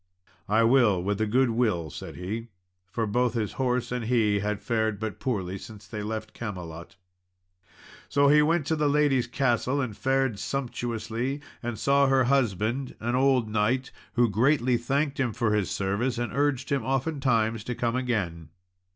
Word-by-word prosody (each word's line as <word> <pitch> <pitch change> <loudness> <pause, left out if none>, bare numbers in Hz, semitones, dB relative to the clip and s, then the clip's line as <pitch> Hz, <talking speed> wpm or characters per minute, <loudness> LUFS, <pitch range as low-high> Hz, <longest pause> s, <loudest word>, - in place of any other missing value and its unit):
"I 110 +2 +4
will, 115 -7 +4
with 100 +2 -1
a 110 - +1
good 125 +3 +3
will," 105 -10 0
said - - -8
he, 110 +6 -5 0.4
for 115 +3 -1
both 120 +3 +1
his 110 -3 -1
horse 125 -1 0
and 125 -2 -2
he 110 -4 +2
had 105 0 -2
fared 110 -2 -1
but 110 -3 -4
poorly 95 -7 -2
since 105 -1 -11
they 105 +2 -6
left 110 +1 -5
Camelot. 90 -7 -7 1.1
So 140 0 +4
he 150 +1 +6
went 160 0 +2
to 160 - +1
the 150 -1 +1
lady's 145 -4 +2
castle 125 +1 0
and 125 -6 -2
fared 135 -4 0
sumptuously, 120 +1 -3 0.2
and 120 -2 -4
saw 140 +3 +3
her 135 -1 +4
husband, 120 0 0
an 120 +2 -2
old 130 -2 +3
knight, 110 +5 0 0.2
who 120 0 +4
greatly 125 +4 +2
thanked 140 +5 -1
him 125 -4 0
for 115 -2 0
his 105 -4 +1
service, 105 +6 -1
and 120 0 -3
urged 140 -1 0
him 140 -1 +1
oftentimes 130 -6 0
to 125 - -3
come 120 +1 -1
again. 100 - -2
120 Hz, 170 wpm, -27 LUFS, 105-135 Hz, 1.1 s, he